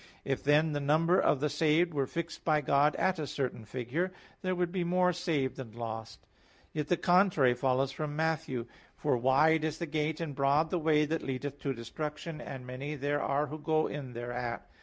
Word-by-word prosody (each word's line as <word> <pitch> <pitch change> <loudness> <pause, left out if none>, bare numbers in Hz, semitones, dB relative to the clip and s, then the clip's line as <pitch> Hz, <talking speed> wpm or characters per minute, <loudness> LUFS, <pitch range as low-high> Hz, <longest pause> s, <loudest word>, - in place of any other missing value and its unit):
If, 135 -1 -1
then, 150 +2 +4
the 145 - -1
number 160 +6 +3
of 135 - +2
the 150 - +2
saved 155 +3 +2
were 140 -2 0
fixed 170 +2 -5
by 155 -2 +3
God 145 +2 +3
at 190 -2 +1
a 150 - -2
certain 125 -6 -3
figure, 130 - -2 0.3
there 185 -1 0
would 175 -1 0
be 185 -1 -1
more 180 +1 +2
saved 160 -7 -1
than 125 -5 -8
lost. 115 -1 -6 0.5
Yet 150 -1 -2
the 175 - +2
contrary 175 -8 +4
follows 130 +2 +1
from 145 +1 -4
Matt. 160 0 +1
7:13,14: 125 -6 -5 0.3
"For 145 -3 +1
wide 145 +6 +4
is 155 0 -1
the 170 - -3
gate, 155 0 -1
and 165 -4 -3
broad 140 +4 +2
the 180 - +1
way 155 -1 +3
that 160 +2 -1
leadeth 140 +1 -4
to 140 -1 -2
destruction, 150 +6 -5
and 130 -2 -7
many 135 +4 -5
there 145 +1 -1
are 140 +2 +1
who 155 +2 -7
go 155 0 +1
in 135 -4 -5
thereat. 120 0 -4
150 Hz, 200 wpm, -31 LUFS, 135-160 Hz, 0.5 s, then